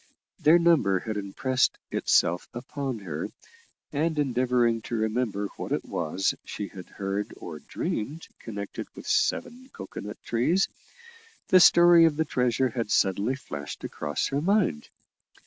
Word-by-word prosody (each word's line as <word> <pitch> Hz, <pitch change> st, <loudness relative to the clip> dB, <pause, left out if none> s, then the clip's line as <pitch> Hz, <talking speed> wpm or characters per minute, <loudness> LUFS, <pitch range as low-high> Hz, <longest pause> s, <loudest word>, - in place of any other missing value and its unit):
Their 160 Hz, +3 st, +6 dB
number 155 Hz, -, +3 dB
had 110 Hz, +1 st, -4 dB
impressed 115 Hz, +6 st, 0 dB
itself 85 Hz, +1 st, +2 dB
upon 130 Hz, +1 st, -4 dB
her, 95 Hz, -5 st, -5 dB, 0.7 s
and, 155 Hz, +2 st, 0 dB
endeavouring 125 Hz, -4 st, +2 dB
to 120 Hz, -, -5 dB
remember 110 Hz, -2 st, -1 dB
what -, -, -6 dB
it -, -, -1 dB
was 85 Hz, +4 st, -1 dB
she 105 Hz, -, -6 dB
had 90 Hz, -2 st, -10 dB
heard 100 Hz, +1 st, -4 dB
or 80 Hz, -3 st, -8 dB
dreamed 145 Hz, -, -4 dB
connected 100 Hz, -3 st, -6 dB
with -, -, -10 dB
seven 425 Hz, -, 0 dB
cocoa -, -, -8 dB
nut 105 Hz, +1 st, -7 dB
trees, 160 Hz, +12 st, +2 dB, 0.8 s
the 185 Hz, -, +7 dB
story 175 Hz, -1 st, +7 dB
of 160 Hz, -2 st, +2 dB
the 160 Hz, +1 st, 0 dB
treasure 125 Hz, 0 st, +1 dB
had 115 Hz, -2 st, -3 dB
suddenly 100 Hz, +7 st, +2 dB
flashed 70 Hz, -, -7 dB
across 75 Hz, 0 st, -2 dB
her 140 Hz, +1 st, -1 dB
mind. 185 Hz, -, +1 dB
120 Hz, 140 wpm, -27 LUFS, 100-155 Hz, 0.8 s, the